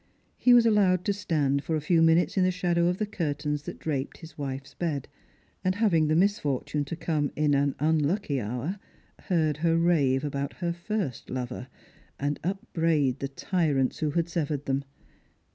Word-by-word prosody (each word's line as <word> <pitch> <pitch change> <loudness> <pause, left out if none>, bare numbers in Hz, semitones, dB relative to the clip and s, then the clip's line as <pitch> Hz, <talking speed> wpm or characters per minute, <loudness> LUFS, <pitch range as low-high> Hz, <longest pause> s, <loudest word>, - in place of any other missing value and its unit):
He 245 -1 +5
was 235 -1 +6
allowed 195 -5 +3
to 200 - +2
stand 150 -8 0
for 160 - -1
a - - +1
few 165 +2 +2
minutes 165 +2 +4
in 190 - +3
the 185 - +4
shadow 175 -1 +1
of 180 +1 +1
the 215 - 0
curtains 150 -6 -2
that - - -6
draped 140 -3 -3
his 165 -1 -12
wife's 135 -1 -5
bed; 155 -6 -3 0.6
and 185 0 +1
having 185 -8 +3
the 155 - +2
misfortune 150 -6 +1
to 155 - -5
come 155 -3 -1
in 150 -1 +2
an 140 0 +2
unlucky 155 0 +1
hour, 125 - -3 0.5
heard 155 -5 +1
her 165 +1 +2
rave 150 -6 +3
about 140 -1 -3
her 170 -2 -2
first 175 - -4
lover, 125 0 -4 0.5
and 145 +1 -1
upbraid 160 -7 0
the 140 - -2
tyrants 140 -2 0
who 155 - 0
had 165 +3 0
severed 150 -4 -2
them. 135 +1 -1
155 Hz, 175 wpm, -27 LUFS, 140-175 Hz, 0.6 s, was